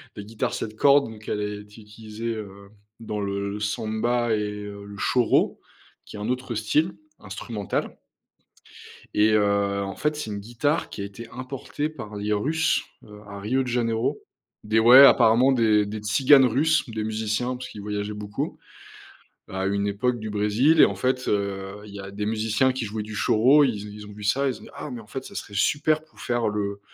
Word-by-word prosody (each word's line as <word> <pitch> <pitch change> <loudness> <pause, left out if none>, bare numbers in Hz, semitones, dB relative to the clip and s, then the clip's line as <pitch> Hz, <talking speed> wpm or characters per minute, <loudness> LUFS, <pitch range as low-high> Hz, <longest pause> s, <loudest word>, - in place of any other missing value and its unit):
Les 105 - -7
guitares 110 +1 -3
7 110 - -4
cordes, 140 +1 +4
donc 110 -1 -12
elle 105 - -1
a 105 0 -4
été 105 +2 -15
utilisée, 110 +2 -6
heu, 100 -2 -9 0.3
dans 105 -2 -5
le 100 0 -2
le 105 +1 -5
samba 110 +3 -1
et 105 - -1 0.2
heu, 100 0 -9
le 100 0 -10
choro, 125 +2 +2 0.5
qui - - -10
est - - -7
un 105 - -3
autre 125 -1 -2
style 130 - +1 0.2
instrumental. 105 -5 -4 1.2
Et 105 +1 +4
heu, 100 -1 +2
en 95 -1 -5
fait, 150 0 -1
c'est 150 -7 -5
une 100 -1 -4
guitare 120 +8 -1
qui - - -7
a 100 - -3
été 105 +4 -9
importée 135 +3 -4
par 110 -9 -9
les 105 +1 -3
Russes, 160 +9 +1 0.2
heu, 105 0 -13
à 100 0 -8
Rio 125 +7 0
de 130 - -7
Janeiro, 115 -2 -1 0.4
des 110 +1 +2
ouais 125 +5 +10
apparemment 120 +2 +5
des 110 -4 +3
des 105 +1 -5
tziganes 130 +6 +5
russes, 150 +7 +2
des 110 -1 -3
musiciens, 110 +3 -2
parce 130 +1 -8
qu'ils 105 - -9
voyageaient 105 0 -3
beaucoup 105 -1 -5 0.9
à 95 0 -3
une 100 +1 0
époque 120 +4 -1
du 110 -1 -5
Brésil 110 +10 +3
et - - +10
en - - 0
fait, 130 0 -1
heu, 100 0 -2
il 105 - -12
y 100 - -8
a 100 0 -9
des 105 +1 -4
musiciens 110 +4 +1
qui 125 -3 -3
jouaient 110 +1 -4
du 105 0 -8
choro. 130 +8 +5
Ils 105 -6 -2
ont - - -8
ils 105 0 -10
ont 105 - -11
vu 105 +1 -11
ça, 135 +7 +2
ils 130 - -3
ont - - -17
dit: - - -12
«Ah, 150 - -7
mais, 120 - -6
en 105 - -16
fait, 135 -1 -6
ça - - -11
serait 100 - -7
super 155 +8 +1
pour 155 - -20
faire 120 -2 0
le 100 -1 -3
110 Hz, 205 wpm, -25 LUFS, 105-125 Hz, 1.2 s, ouais